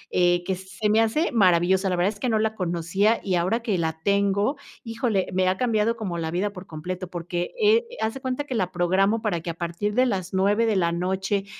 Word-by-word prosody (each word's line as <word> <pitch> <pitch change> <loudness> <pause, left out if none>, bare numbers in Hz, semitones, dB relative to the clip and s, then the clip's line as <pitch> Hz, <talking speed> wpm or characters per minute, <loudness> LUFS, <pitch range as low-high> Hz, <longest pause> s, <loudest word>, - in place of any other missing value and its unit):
eh, 175 -1 +3
que 190 0 -1
se 190 +3 -4
me 220 +1 +4
hace 265 +10 +1
maravillosa. 190 -3 +3
La 180 - 0
verdad 180 +4 +1
es 205 - -16
que 255 - -1
no 220 - +2
la 220 0 0
conocía 185 +4 0
y 190 - -1
ahora 185 +7 0
que 215 -5 -1
la 160 -1 -2
tengo, 200 +6 +1 0.3
híjole, 225 -4 -1
me 185 0 +2
ha 185 +1 +1
cambiado 230 -1 +1
como 190 -6 -4
la 160 -1 -2
vida 195 +4 -1
por 180 -1 -10
completo. 180 +4 -5
Porque, 175 0 -4
eh, 445 +2 +4
haz 220 0 0
de 270 - -8
cuenta 260 +2 -2
que 280 -3 -6
la 185 -6 -1
programo 190 +5 +1
para 200 -6 0
que 170 - -6
a - - -2
partir 175 +5 -3
de 255 - +4
las 190 -6 -2
9, 205 +4 +2
de 215 - +1
la 170 -3 +2
noche 190 +3 -1
195 Hz, 235 wpm, -24 LUFS, 175-220 Hz, 0.3 s, me